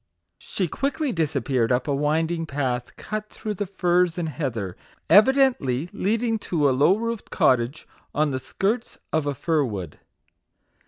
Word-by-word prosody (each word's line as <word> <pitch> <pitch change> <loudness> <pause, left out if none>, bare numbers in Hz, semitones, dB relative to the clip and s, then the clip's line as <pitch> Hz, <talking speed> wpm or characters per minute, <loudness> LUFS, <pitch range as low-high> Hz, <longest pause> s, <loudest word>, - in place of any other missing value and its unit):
She 185 - -2
quickly 280 - -1
disappeared 140 - 0
up 125 +2 +1
a 145 - +1
winding 160 +3 0
path 130 -4 -2
cut 215 0 -5
through 215 - -5
the 205 0 -3
furze 180 -2 +1
and 170 -2 -2
heather, 115 - -3 0.4
evidently 205 - +4
leading 225 +3 0
to 155 -7 +1
a - - +4
low 145 +9 +4
roofed 230 -1 -4
cottage 125 +3 +1 0.2
on 150 0 +1
the 130 - -2
skirts 215 - -2 0.2
of 155 -2 +1
a 145 - -1
fir 160 +2 +1
wood. 95 - -5
160 Hz, 150 wpm, -24 LUFS, 135-205 Hz, 0.4 s, evidently